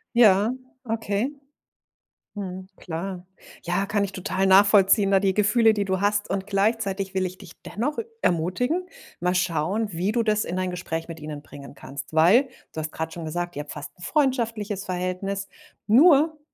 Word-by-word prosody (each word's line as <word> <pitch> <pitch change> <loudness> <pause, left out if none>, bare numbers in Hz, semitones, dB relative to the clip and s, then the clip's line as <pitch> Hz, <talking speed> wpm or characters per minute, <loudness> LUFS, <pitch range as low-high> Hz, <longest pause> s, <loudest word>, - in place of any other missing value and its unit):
Ja, 215 0 +5 0.3
okay. 225 +2 -1 1.0
Mhm, 185 -2 -6
klar. 180 +2 -6 0.3
Ja, 175 +3 -1
kann 205 0 0
ich 200 - -3
total 190 0 -1
nachvollziehen, 195 +1 +5
da 195 - +5
die 190 -1 +1
Gefühle, 220 +2 +4
die 205 -1 0
du 190 0 -1
hast. 205 0 +1
Und 195 0 -2
gleichzeitig 200 -1 0
will 190 -1 0
ich 185 +1 -10
dich 185 -4 -13
dennoch 265 +8 -3 0.2
ermutigen, 245 - 0 0.3
mal 180 +1 0
schauen, 185 +5 0
wie 180 +4 -1
du 230 +1 +1
das 215 -1 +1
in 180 - -4
ein 185 -1 -1
Gespräch 165 -2 -4
mit 165 -1 -8
ihnen 150 -1 -7
bringen 140 0 -12
kannst. 140 -1 -8
Weil, 190 - +6 0.3
du 160 - -5
hast 155 0 -4
grad 160 0 -4
schon 170 - -7
gesagt, 175 +2 -4
ihr 145 - -3
habt 150 - -9
fast 145 -1 -7
'n - - -16
freundschaftliches 230 - 0
Verhältnis, 185 +2 -3 0.4
nur 300 +6 +5
195 Hz, 170 wpm, -24 LUFS, 180-215 Hz, 1.0 s, Weil